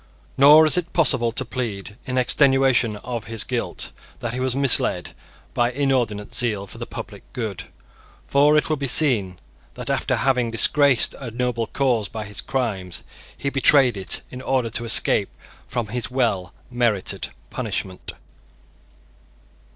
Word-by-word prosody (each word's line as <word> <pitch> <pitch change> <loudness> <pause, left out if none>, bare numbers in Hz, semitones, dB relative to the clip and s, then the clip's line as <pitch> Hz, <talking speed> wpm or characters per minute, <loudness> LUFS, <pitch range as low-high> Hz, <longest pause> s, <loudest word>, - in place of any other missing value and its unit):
Nor 145 +4 +7
is 155 - +5
it 175 -1 -3
possible 120 -8 +2
to 130 +3 -2
plead, 110 -5 -5
in 130 0 -2
extenuation 130 -3 +3
of 115 +1 -6
his 115 -1 -2
guilt, 125 -2 -3 0.3
that 120 -1 -4
he 125 - -3
was 130 -1 -1
misled 135 -3 +2 0.4
by 120 0 +1
inordinate 125 -6 -1
zeal 110 -5 -1
for - - -11
the - - -6
public - - -8
good. 110 -7 -5 0.6
For 145 +2 +4
it 150 - +1
will 155 - -1
be 140 -1 -3
seen 115 - +2 0.4
that - - -4
after - - 0
having 125 -3 +1
disgraced 135 +2 +4
a 125 - -6
noble 120 -1 -2
cause 120 -6 0
by 110 -1 -6
his 100 +1 -5
crimes, 100 -9 -3 0.3
he 140 - -3
betrayed 135 -3 +5
it 95 -1 0
in 125 - -8
order 130 -3 -1
to 120 +1 -2
escape 115 - +3 0.4
from 120 -4 -3
his 120 +1 -3
well 110 -9 -1 0.2
merited 120 -6 -1 0.2
punishment. 95 -1 -4
125 Hz, 150 wpm, -22 LUFS, 110-135 Hz, 0.6 s, Nor